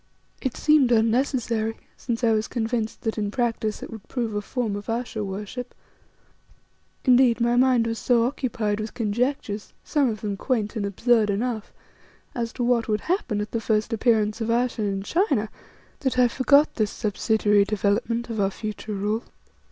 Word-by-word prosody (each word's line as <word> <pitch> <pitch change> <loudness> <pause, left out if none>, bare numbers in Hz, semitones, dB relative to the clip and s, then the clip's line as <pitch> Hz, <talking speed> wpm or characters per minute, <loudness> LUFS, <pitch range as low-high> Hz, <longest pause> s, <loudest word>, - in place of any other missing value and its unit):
It 260 -3 -2
seemed 300 -5 +4
unnecessary, 230 -1 +1 0.2
since 235 -1 -4
I 230 - +4
was 215 0 +1
convinced 225 -1 -2
that 220 -1 -2
in 205 -1 -1
practice 225 -2 -1
it - - -8
would 220 -3 -10
prove 235 -4 -2
a 205 - -1
form 225 -1 -2
of 205 +1 -7
Ayesha 230 -1 -2
worship, 210 +6 -6 1.3
Indeed, 250 -1 +5
my 235 0 +2
mind 250 -2 +4
was 230 -1 -2
so 235 -2 +3
occupied 225 -5 -1
with 215 0 -5
conjectures, 230 -1 -2
some 285 -4 +2
of 215 -1 -4
them 205 -3 -3
quaint 220 -1 -1
and 205 -2 -1
absurd 220 +2 +2
enough, 220 +1 -2 0.6
as 230 -2 -2
to 245 - -3
what 240 -1 +2
would 210 -2 0
happen 270 - -1
at 210 - -5
the 230 - -2
first 215 +1 0
appearance 220 -1 +2
of 225 - -1
Ayesha 240 0 +1
in 195 -2 -1
China 275 - +1 0.5
that 265 -2 -1
I 250 -1 +6
forgot 280 +4 +3
this 215 -3 +1
subsidiary 210 -1 +2
development 215 +3 0
of 220 - -3
our 195 -1 +2
future 215 +1 -6
rule. 210 +3 -1
225 Hz, 170 wpm, -24 LUFS, 210-245 Hz, 1.3 s, I